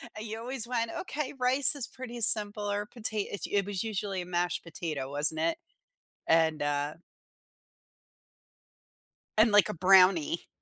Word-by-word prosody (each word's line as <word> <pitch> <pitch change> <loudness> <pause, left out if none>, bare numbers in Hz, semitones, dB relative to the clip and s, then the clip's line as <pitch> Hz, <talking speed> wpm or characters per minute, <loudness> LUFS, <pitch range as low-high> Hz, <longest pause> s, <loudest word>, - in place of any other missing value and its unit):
And 215 +1 -7
you 220 +1 -5
always 245 0 -5
went, 230 -2 -2
"Okay, 300 -6 -4
rice 260 +1 +4
is 265 -3 -4
pretty 250 -2 -9
simple, 210 -2 +3
or 205 0 -2
pota" 215 -2 -4
it's 200 - -4
us - - -12
It 200 -1 +2
was 200 -2 -3
usually 205 -3 -3
a - - -7
mashed 175 0 -2
potato, 155 -5 -5
wasn't 150 +2 -1
it? 165 +1 0 0.7
And, 160 -1 +2
uh 145 0 -1 2.4
and 220 +1 +5
like 205 -3 +5
a - - -3
brownie. 180 -2 +4
205 Hz, 155 wpm, -29 LUFS, 170-230 Hz, 2.4 s, and